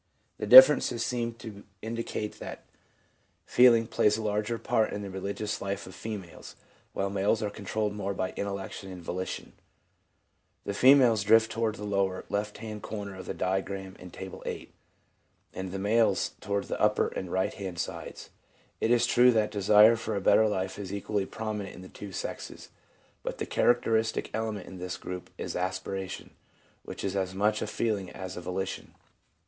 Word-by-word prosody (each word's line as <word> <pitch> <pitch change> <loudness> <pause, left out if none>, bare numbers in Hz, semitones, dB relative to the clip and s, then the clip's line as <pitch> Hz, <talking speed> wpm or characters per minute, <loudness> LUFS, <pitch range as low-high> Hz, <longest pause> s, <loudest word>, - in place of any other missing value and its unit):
The - - -3
differences 130 0 +9
seem 120 -2 -2
to 110 -3 -10 0.2
indicate 115 -1 -4
that - - -8 0.8
feeling 120 -2 +6
plays 105 -2 +2
a 110 - -4
larger 105 +2 -1
part 110 -1 0
in 105 - -4
the 100 - -6
religious 100 +3 -4
life 100 0 -3
of 95 - -11
females 100 -6 -8 0.2
', - - -34
while 100 0 -1
males 100 +3 +1
are 105 - -2
controlled 105 +1 -2
more 100 -1 -3
by 95 -1 -2
intellection 100 -1 -5
and 90 -2 -9
volition. 90 +2 -5 1.1
The 100 - -3
females 125 -2 +6
drift 110 +2 +5
toward 115 -1 -1
the 105 - -8
lower 100 -2 -1
left 105 +1 -2
hand 110 -1 -7
corner 100 -2 -6
of 95 -1 -9
the - - -4
diagram 95 0 -2
in 90 - -10
Table 95 +1 -9
VIII., - - -6 0.8
and 95 -1 -5
the 95 - -4
males 110 +4 +2
toward 100 0 -1
the - - -5
upper - - +3
and 90 -2 -6
right 95 0 0
hand 95 -4 -6
sides. 85 - -6 0.5
It 110 - +1
is 120 -1 +4
true 125 +1 +5
that 110 -2 +1
desire 105 +3 +6
for 110 -1 -4
a - - 0
better 105 +3 +5
life 95 -1 -2
is 95 -2 -6
equally 100 0 -2
prominent 110 -3 -5
in 90 - -11
the 95 - -11
two 100 -1 -9
sexes; - - -6 0.5
but - - -5
the - - -3
characteristic 115 -2 +1
element 110 -3 -3
in 95 - -10
this 90 0 -4
group 90 0 -7
is - - -5
aspiration, 95 +1 -4 0.5
which - - -8
is 95 0 -2
as 95 -1 -2
much 105 +2 +1
a - - -2
feeling 105 -5 -1
as 95 +1 -7
a - - -6
volition. 90 +2 -5
100 Hz, 175 wpm, -29 LUFS, 95-110 Hz, 1.1 s, differences